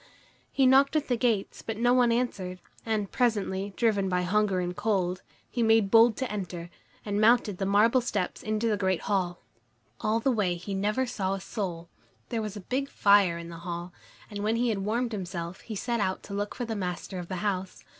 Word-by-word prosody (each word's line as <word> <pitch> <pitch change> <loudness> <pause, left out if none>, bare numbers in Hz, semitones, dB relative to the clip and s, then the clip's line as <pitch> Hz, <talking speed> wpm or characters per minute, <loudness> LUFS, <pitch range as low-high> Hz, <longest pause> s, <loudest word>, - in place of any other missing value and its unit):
He 270 - +3
knocked 270 +3 +5
at 300 -3 0
the 245 - +3
gates, 230 -4 0
but 225 -1 -5
no 245 +2 +3
one 245 -2 +4
answered, 195 -7 -2 0.3
and 215 -3 -1
presently, 205 -5 0
driven 205 -5 +2
by 180 0 +1
hunger 200 +1 +1
and 180 0 -2
cold, 195 -4 0 0.3
he 240 - -3
made 225 -3 +4
bold 230 0 +6
to 260 -4 -2
enter, 180 -4 -5 0.3
and 205 0 0
mounted 220 -4 +4
the 195 - 0
marble 220 +6 +4
steps 210 -6 -2
into 215 +1 -1
the 215 -2 +1
great 190 -3 0
hall. 180 -3 -1 0.6
All 220 +2 +1
the 265 +4 +2
way 200 -7 +1
he 180 +4 -6
never 210 +6 0
saw 195 -5 -2
a - - -5
soul. 180 -4 -4 0.4
There 230 -2 -1
was 210 -1 -5
a - - -7
big 265 +8 -2
fire 200 -7 +4
in 170 0 -8
the 170 - -8
hall, 175 +1 -6 0.3
and 205 -2 -7
when 215 +2 +1
he 240 +1 +1
had 210 -3 0
warmed 230 +5 -1
himself, 180 -3 -5
he 220 - -7
set 235 +3 -1
out 190 -2 -1
to 200 - -8
look 205 +1 -3
for 245 - -3
the 225 -1 -3
master 185 -1 -4
of 175 - -6
the 185 - -4
house. 190 -2 -2
205 Hz, 210 wpm, -28 LUFS, 185-230 Hz, 0.6 s, bold